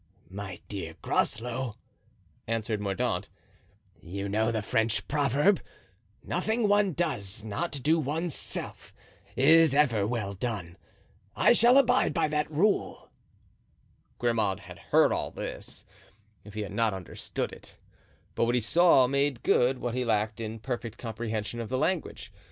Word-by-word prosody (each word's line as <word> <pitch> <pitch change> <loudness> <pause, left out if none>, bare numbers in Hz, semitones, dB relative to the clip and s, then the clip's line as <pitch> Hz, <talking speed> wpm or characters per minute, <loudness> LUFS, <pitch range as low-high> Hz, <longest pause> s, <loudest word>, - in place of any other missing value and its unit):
"My 95 -2 -6
dear 90 -6 -6
Groslow," 120 0 -1 0.7
answered 110 -1 -1
Mordaunt, 100 -2 -1 0.7
"you 100 +3 -5
know 110 +3 +1
the 110 -2 -2
French 110 +1 0
proverb, 145 - +2 0.6
'Nothing 220 +5 0
one 205 -2 +3
does 105 - -2
not 110 +11 -3
do 160 +2 +3
one's 155 +3 -2
self - - -6 0.4
is 160 +1 +5
ever 115 -9 +3
well 110 -4 -2
done.' 95 -5 -4 0.6
I - - +5
shall 240 +3 +6
abide 255 -6 +3
by 165 - +2
that 150 0 -1
rule." 185 +7 0 1.1
Grimaud 110 -5 0
had - - -12
heard - - +3
all - - -1
this, - - -8 0.6
if 105 0 -13
he 110 - -2
had 100 -1 -6
not 110 -1 +1
understood 95 -2 -5
it. - - -13 0.6
But - - +1
what 120 +1 +1
he 125 - +2
saw 165 +2 +5
made 140 -1 0
good 130 +2 +3
what 120 -1 -3
he 125 0 -1
lacked 110 -2 0
in 110 0 -4
perfect 120 -1 -5
comprehension 110 -1 -4
of 115 - -5
the 130 - -1
language. 180 +4 -2
120 Hz, 140 wpm, -28 LUFS, 105-150 Hz, 1.1 s, shall